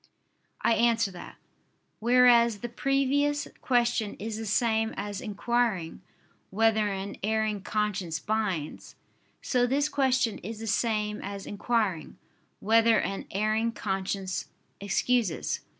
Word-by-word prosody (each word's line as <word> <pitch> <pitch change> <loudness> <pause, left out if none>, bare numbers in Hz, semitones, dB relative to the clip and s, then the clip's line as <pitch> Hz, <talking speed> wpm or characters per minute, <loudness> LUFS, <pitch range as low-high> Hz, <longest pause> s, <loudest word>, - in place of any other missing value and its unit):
I - - +4
answer 230 -3 +2
that, 180 - -10 0.6
Whereas 235 -2 +5
the 240 - -4
previous 275 +3 +1
question 240 -4 +1
is 220 +1 -5
the 225 - -5
same 225 0 +1
as 205 -1 -4
inquiring 215 -6 -1 0.5
"whether 220 +1 +2
an 195 +1 -5
erring 215 -1 0
conscience 195 -5 -2
binds"; 210 -8 -3 0.5
so 245 -2 +2
this 285 +4 +1
question 260 -5 +1
is 220 +4 -7
the 225 - -6
same 210 -1 0
as 200 0 -6
inquiring 205 -6 -1 0.4
"whether 225 +2 +4
an 195 - -3
erring 215 +3 0
conscience 190 -2 -3 0.3
excuses." 205 -1 0
220 Hz, 115 wpm, -28 LUFS, 200-235 Hz, 0.6 s, Whereas